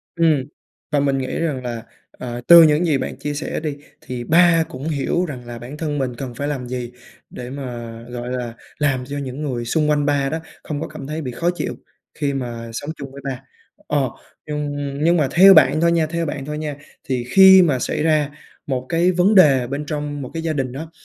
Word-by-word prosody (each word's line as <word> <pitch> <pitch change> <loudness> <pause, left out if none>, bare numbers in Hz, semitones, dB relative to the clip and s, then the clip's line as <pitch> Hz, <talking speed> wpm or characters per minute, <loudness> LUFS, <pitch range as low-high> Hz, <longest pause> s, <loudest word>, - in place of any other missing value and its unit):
Ừm, 160 -5 +3 0.5
và 145 - +2
mình 140 -1 +1
nghĩ 130 -1 -3
rằng 150 -6 -2
là, 120 -2 -5 0.3
ờ, 120 -1 -7
từ 170 -1 +10
những 155 +2 +4
gì 150 -4 +2
bạn 130 - -5
chia 145 0 -4
sẻ 145 - -3
đi, 150 -2 -4 0.2
thì 125 -1 -6
ba 165 +2 +5
cũng 135 +4 -6
hiểu 160 +4 0
rằng 130 -7 -7
là 120 -1 -7
bản 125 +5 -9
thân 150 -2 -2
mình 130 -3 -2
cần 125 0 -6
phải 145 +3 -3
làm 135 -4 -3
gì, 125 -1 -5 0.4
để 125 0 -8
mà, 120 -4 -6 0.2
gọi 120 0 -5
là, 125 -2 -4 0.2
làm 135 -4 0
cho 140 +2 -5
những 135 0 -5
người 125 -5 -3
xung 150 +5 +1
quanh 145 -1 +2
ba 140 -1 +1
đó 160 - -2 0.2
không 150 -1 -4
có - - -3
cảm 150 -3 -9
thấy 155 +1 -4
bị 130 -3 -4
khó 170 +9 -1
chịu - - -3 0.4
khi 145 -2 -2
mà 120 -3 -5
sống 145 +6 -5
chung 140 -2 -8
với 140 +1 -10
ba. 135 -2 -4 0.5
Ờ, 140 -4 +1 0.4
nhưng 150 -1 -3 0.3
nhưng 170 +2 +4
mà 150 -4 +2
theo 195 +3 +8
bạn 155 -3 +5
thôi 170 - +4
nha 165 -2 +2
theo 170 +1 -2
bạn 145 -3 -4
thôi 150 0 -4
nha 150 -2 -4 0.3
thì 125 -2 -2
khi 190 +1 +8
mà 145 -7 +2
xảy 150 - -2
ra 155 -3 +2 0.4
một 130 -2 -2
cái 175 +2 +3
vấn 185 +4 +3
đề 135 -9 +6
bên 140 +3 -4
trong 145 -1 -4
một 130 - -6
cái 165 0 -4
gia 160 - -1
đình 130 -4 -2
đó, 155 +5 -7
145 Hz, 230 wpm, -20 LUFS, 130-155 Hz, 0.5 s, từ